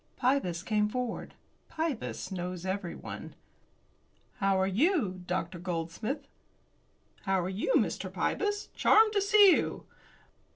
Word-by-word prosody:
Pybus 245 -10 +1
came 210 0 +1
forward. 250 +1 -4 0.3
Pybus 315 -10 -3
knows 180 -1 -4
everyone. 190 -2 -5 1.0
"How 195 -1 +2
are 190 - +3
you, 210 - +1
Dr. 175 -1 -2
Goldsmith?" 180 - -4 1.0
"How 195 -1 +2
are 180 - -2
you, 200 - -1
Mr. - - -1
Pybus? 415 0 -1
Charmed 435 0 +5
to 405 - +2
see 400 0 +7
you." - - 0
210 Hz, 115 wpm, -30 LUFS, -, 1.0 s, see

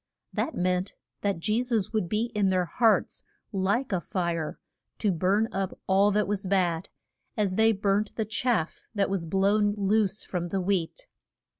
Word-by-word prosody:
That 320 - -2
meant 180 +1 0 0.3
that 200 -2 0
Je 215 +7 +1
sus 230 -5 -1
would 215 -6 0
be 220 +4 0
in 205 -2 +2
their 185 -1 +2
hearts 225 +5 +2 0.3
like 205 +6 0
a 185 -3 0
fire, 170 -4 -2 0.4
to 210 - +1
burn 190 +6 +2
up 195 -2 -3
all 195 +2 +4
that 210 0 +1
was 200 -1 -2
bad, 180 -3 +1 0.5
as 205 -3 +1
they 220 +3 +4
burnt 200 0 0
the 220 - -1
chaff 220 -5 -1
that 200 -1 +1
was 180 -4 -1
blown 205 +3 +2
loose 205 0 +1
from 175 -2 -3
the 195 +3 -1
wheat. 190 - -1
195 Hz, 165 wpm, -27 LUFS, 185-215 Hz, 0.5 s, all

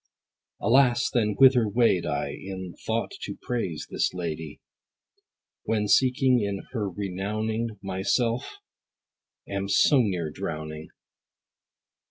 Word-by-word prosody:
Alas 125 +1 +3
then 105 -4 +1
whither 130 -5 +6
wade 115 -5 +2
I - - -1
In 95 -2 -7
thought - - -1
to - - -6
praise 90 -11 -3
this - - 0
lady, 80 -3 -5 1.1
When 105 -2 0
seeking 125 -4 +3
her 105 -5 -2
renowning 105 +4 -3
My 95 -1 -3
self 115 +4 0 0.9
am 100 0 -3
so 135 +8 +5
near 90 -8 -1
drowning? 75 -3 -6
105 Hz, 105 wpm, -26 LUFS, 95-120 Hz, 1.1 s, whither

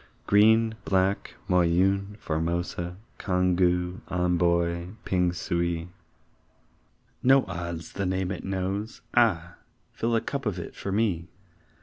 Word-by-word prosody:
Green, 110 +2 +5
Black, 95 +1 0
Moyune, 95 +3 +2
Formosa, 85 +1 -2 0.2
Congou, 90 -1 +1
Amboy, 85 -1 +1 0.2
Pingsuey 85 -1 0 1.3
No 135 +1 +5
odds 85 -1 -5
the 100 -1 -2
name 95 0 -1
it 100 - -5
knows 95 +3 -3
ah! - - +2 0.4
Fill 115 +1 0
a 115 - +2
cup 140 -3 -3
of 100 -3 -1
it 85 - -6
for 100 - -5
me! 95 -5 0
90 Hz, 105 wpm, -27 LUFS, 85-100 Hz, 1.3 s, Green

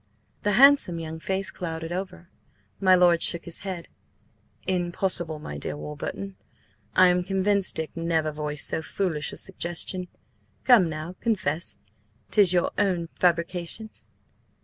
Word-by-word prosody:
The 205 - +1
handsome 270 -8 +6
young 160 0 -6
face 190 +3 -2
clouded 165 -1 -5
over. 185 -1 -5 0.5
My 185 -2 +6
lord 175 -2 +4
shook 170 -1 +1
his 170 - -5
head. 185 -4 -5 0.8
"Impossible, 175 -2 0
my 75 - -7
dear 75 - -4
Warburton. 95 +6 -6 0.6
I 185 0 +7
am 180 0 +2
convinced 195 +1 +1
Dick 160 -1 -4
never 165 -2 0
voiced 150 -2 -3
so - - +1
foolish 160 -3 -2
a - - -9
suggestion. 180 0 -2 0.6
Come 220 -9 +6
now, 155 +3 -5
confess! 190 -8 -1 0.5
'tis 200 -4 +5
your 175 -1 +2
own 180 -5 +1
fabrication?" 175 +4 0
175 Hz, 130 wpm, -26 LUFS, 160-190 Hz, 0.8 s, I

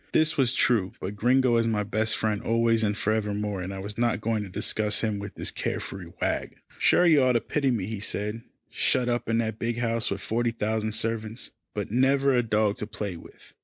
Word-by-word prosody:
This 155 0 +3
was 130 -3 +2
true, 105 -7 +2
but 100 +3 -5
Gringo 125 +3 +3
is 115 0 +2
my 105 -2 +1
best 110 +2 -1
friend 105 -2 -1
always 115 0 +2
and 105 -1 0
forevermore, 105 -2 -1
and 90 +2 -5
I 95 - -6
was 105 +3 -6
not 120 -3 +1
going 110 0 -1
to 100 - -6
discuss 105 +1 0
him 110 -3 -1
with 100 0 -7
this - - -2
care - - -2
free - - -8
wag. - - -2 0.2
"Sure 180 - +5
you 155 -5 +6
ought 130 -1 +4
to 120 - +3
pity 140 +3 0
me," 115 -7 0
he 110 0 -5
said, 105 +2 -2 0.3
"shut 125 -2 +2
up 120 -1 -1
in 115 - +2
that 110 -1 -1
big 115 0 -2
house 115 -1 0
with 100 - -3
forty 120 +3 0
thousand 110 -1 -2
servants, 115 +1 -2 0.2
but 105 -1 -3
never 135 +3 +3
a 125 - +4
dog 105 -2 +1
to 105 - -5
play 105 -3 -5
with." 80 - -15
110 Hz, 220 wpm, -26 LUFS, 105-120 Hz, 0.3 s, you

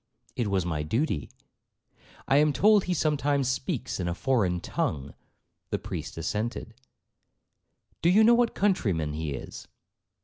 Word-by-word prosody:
'—'It 120 - -1
was 95 -3 0
my 80 -3 -2
duty.'—'I 115 - -4
am 150 +1 +4
told 210 +4 +4
he 180 - 0
sometimes 145 -3 +1
speaks 130 - -2
in 90 - -2
a 85 - -2
foreign 100 -8 +1
tongue.' 70 -5 -3 0.6
The - - -1
priest - - -6
assented. 110 +7 -3 1.3
'Do 170 - +3
you 205 +5 +6
know 235 +2 +7
what 235 -1 +2
countryman 95 - 0
he 75 -2 -3
is?' - - -9
120 Hz, 135 wpm, -27 LUFS, -, 1.3 s, know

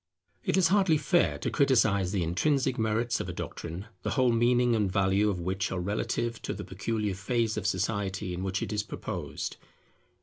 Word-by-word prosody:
It - - +1
is 180 -3 +4
hardly 190 -5 +4
fair 175 +3 +2
to - - -3
criticize 110 - +3
the 95 -3 0
intrinsic 125 - +1
merits 115 +2 +1
of - - -4
a - - -4
doctrine, 85 +4 -6 0.2
the - - -2
whole 130 -2 +3
meaning 120 +1 +3
and 105 -4 +1
value 100 +2 +2
of 95 -3 -2
which 95 +1 -2
are 95 - -2
relative 110 +5 -2
to - - -4
the - - -6
peculiar 105 +2 -2
phase 110 +3 0
of 105 -2 -2
society 100 -1 -1
in 90 - -4
which 95 0 -1
it 105 - -4
is 105 - +1
proposed. 105 - -5
105 Hz, 190 wpm, -29 LUFS, 95-120 Hz, 0.2 s, is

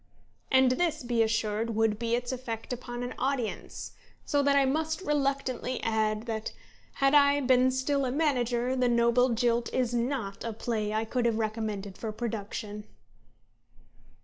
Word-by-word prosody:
And 260 -1 +5
this, 310 +1 0
be 240 -1 +1
assured, 220 0 0
would 220 -1 +2
be 235 0 +1
its 245 +1 -3
effect 245 -2 -5
upon 240 0 -6
an 245 - -4
audience. 260 -4 -3 0.3
So 285 - +2
that 280 0 +3
I 280 -1 +5
must 315 +4 0
reluctantly 275 -5 -1
add 220 0 0
that, 220 -2 -4 0.4
had 275 0 +2
I 285 -1 +6
been 255 -1 +4
still 265 +2 0
a 250 - -1
manager, 250 -4 +1
The 250 -1 +2
Noble 235 +1 +3
Jilt 235 0 +1
is 245 -2 0
not 235 -4 -2
a 230 -1 -3
play 215 -1 -2
I 220 +1 0
could 240 +1 0
have 225 -2 +1
recommended 215 -3 -3
for 220 - -3
production." 210 -2 -5
240 Hz, 155 wpm, -29 LUFS, 225-260 Hz, 0.4 s, I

